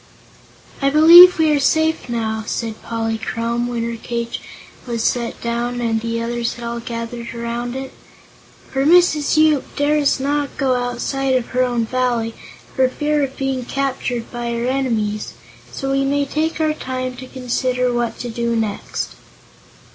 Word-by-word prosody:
"I 275 - +3
believe 340 +5 +9
we 320 -1 +3
are - - +1
safe, 315 -1 +1
now," 220 -2 -2
said 225 -2 -3
Polychrome, 230 +1 -2
when 235 -1 -2
her 235 0 -4
cage 235 0 -4 0.5
was 230 -2 -2
set 235 -1 -1
down 240 +1 -2
and 225 -2 0
the 230 0 -2
others 235 0 -2
had 240 - -8
all 235 0 -3
gathered 235 0 -6
around 235 +1 -4
it, 265 0 -6 0.8
"for 270 0 0
Mrs. 315 -2 +4
Yoop 310 -3 +3
dares 290 -1 +2
not 285 +1 -1
go 265 -2 +2
outside 250 +2 -1
of 250 -2 -1
her 255 - 0
own 240 -2 0
Valley, 240 -2 -1 0.4
for 260 -1 +3
fear 295 +3 0
of 270 0 -4
being 270 -2 -2
captured 255 -2 -3
by 240 -1 -3
her 235 0 -2
enemies. 230 -6 -1 0.4
So 270 0 -3
we 275 0 +2
may 285 +1 +1
take 315 +3 -2
our 310 -1 +2
time 255 -3 -4
to 255 +1 -8
consider 250 -1 -1
what 240 -1 -1
to 245 - -4
do 235 0 -1
next." 220 -3 -3
245 Hz, 160 wpm, -19 LUFS, 235-275 Hz, 0.8 s, believe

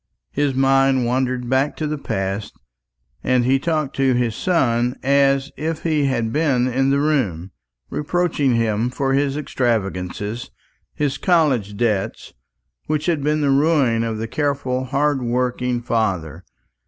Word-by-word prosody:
His 145 -2 0
mind 135 -1 +3
wandered 125 0 -1
back 130 +3 +1
to 155 - -2
the 150 -1 -3
past, 95 -3 -3 0.7
and 125 -1 +2
he 135 +2 +3
talked 155 -2 -1
to 135 -2 +3
his 120 -3 0
son 125 -9 +1
as 140 0 +2
if 160 +1 -3
he 155 -3 +1
had 120 -4 -1
been 140 -5 +2
in 135 +2 +1
the 140 +1 +2
room, 110 - 0 0.4
reproaching 150 -4 0
him 115 0 +1
for 135 +1 -1
his 140 +1 +1
extravagance, 110 -5 -2 0.5
his 145 -1 -1
college 135 - +2
debts, 105 -5 -1 0.5
which 155 -1 -1
had 160 -5 0
been 150 +1 +1
the 140 -2 +2
ruin 135 -5 +3
of 115 -1 -2
his 115 +1 -4
careful 140 -3 -1
hard 140 +1 0
working 125 0 -1
father. 95 -8 -2
130 Hz, 140 wpm, -21 LUFS, 120-145 Hz, 0.7 s, mind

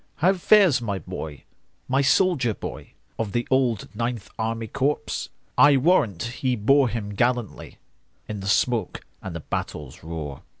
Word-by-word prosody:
"How 185 +4 +3
fares 185 - +5
my 100 -4 -2
boy,—my 80 - -5
soldier 135 - +3
boy, - - -8 0.3
Of 105 -3 -2
the 120 0 -1
old 125 -5 +2
Ninth 115 -4 -3
Army 115 0 -2
Corps?I 140 +2 +1
warrant 130 - +2 0.2
he 130 -2 +1
bore 130 +4 +4
him 105 -2 -4
gallantlyIn 120 0 -1 0.5
the 100 -2 -5
smoke 115 0 0 0.2
and - - -6
the - - -5
battle's 75 +4 -5
roar!" 80 -4 -6
115 Hz, 130 wpm, -24 LUFS, 100-135 Hz, 0.5 s, fares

